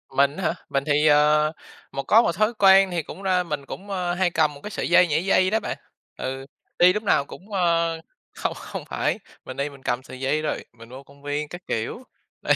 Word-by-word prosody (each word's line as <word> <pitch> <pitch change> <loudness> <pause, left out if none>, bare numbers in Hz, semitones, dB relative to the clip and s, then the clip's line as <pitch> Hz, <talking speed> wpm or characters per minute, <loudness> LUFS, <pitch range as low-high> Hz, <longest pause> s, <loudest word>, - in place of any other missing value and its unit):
Mình 140 +3 +3
hả, 180 -5 -1
mình 140 0 0
thì, 150 +1 +3
ờ, 150 +1 +4 0.4
một 140 - -4
có 220 +10 +6
một 170 - +1
thói 215 +4 +2
quen 195 -2 +6
thì 170 -3 -1
cũng 195 - -10
đa 185 -1 +2
mình 150 -4 -5
cũng, 200 +7 -9
a, 180 -2 -1
hay 180 0 +1
cầm 155 -3 +1
một 140 - -13
cái - - -5
sợi - - -3
dây 180 0 +6
nhảy 155 +3 0
dây 185 -1 +3
đó 220 +2 +1
bạn. - - -4 0.4
Ừ, 135 +1 -4 0.3
đi 180 +1 +7
lúc 210 +1 -3
nào 140 -8 +2
cũng, 195 +8 -13
ơ, 170 -3 +1 0.4
không - - -2
không - - -7
phải, - - -1 0.3
mình 130 +1 -8
đi 140 +1 -1
mình 140 -2 -15
cầm 125 +1 -1
sợi 130 - -11
dây 135 +4 0
rồi, 155 - -3
mình 115 -1 -15
vô 130 +2 -10
công 140 +1 -20
viên 145 +1 -2
các 175 - -8
kiểu, 115 - -3 0.4
đây, - - +3
155 Hz, 235 wpm, -24 LUFS, 140-185 Hz, 0.4 s, đi